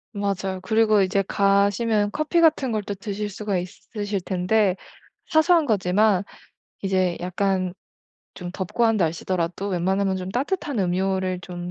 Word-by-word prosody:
맞아요. 195 -2 -2
그리고 215 +1 +3
이제 195 +1 +1
가시면 205 +2 +2
커피 310 +5 0
같은 300 -6 +3
걸 215 -1 -1
또 205 - -4
드실 205 +1 -4
수가 205 -1 -2
있으실 200 +2 -5
텐데 185 +2 +1 0.5
사소한 320 0 +4
거지만 200 -2 +2 0.6
이제 185 -2 +1
약간 185 0 -1 0.6
좀 180 -2 -7
덥고 190 +5 -1
한 225 -1 +3
날씨더라도 175 +2 -1
웬만하면 190 +1 0
좀 185 0 -5
따뜻한 285 - -2
음료를 185 0 0
좀 175 0 -6
195 Hz, 290 characters per minute, -23 LUFS, 185-215 Hz, 0.6 s, 사소한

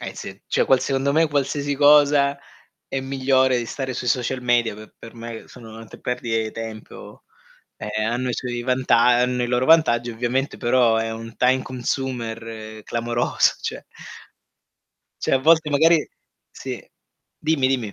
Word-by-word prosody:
eh, - - -6
sì. - - -9
Cioè - - +1
qual 130 -1 +3
secondo 135 +1 0
me, 160 +1 +3
qualsiasi 145 0 -1
cosa 145 -1 +4 0.5
è 135 - -3
migliore 130 -1 +1
di 120 - -4
stare 130 +1 -4
sui 125 0 -5
social 125 +1 -1
media, 120 -3 +1
pe 110 +1 -13
per 115 - -11
che - - -19
me 115 0 -8
sono 115 -3 -12
ante 115 -1 -12
perdite 115 -3 -2
i - - -8
tempo. 110 -1 -9 0.5
Ehm, 110 0 -3
hanno 125 +1 -2
i 120 - -1
suoi 120 -1 -4
vanta 130 -1 +2 0.3
hanno 125 0 0
i - - 0
loro 125 +1 0
vantaggi 130 -7 +4
ovviamente, 125 +4 -2
però 120 -2 +3
è 115 0 -1
un 115 0 -8
time 130 +1 +2
consumer 115 -4 -5
clamoroso, 120 0 0
cioè - - -5 1.4
Cioè - - -1
a 135 - +5
volte 160 +2 +3
magari 160 +2 +4 0.4
sì, - - -7 0.6
dimmi, 155 -4 +1
dimmi. 120 -6 -1
125 Hz, 160 wpm, -22 LUFS, 115-135 Hz, 1.4 s, a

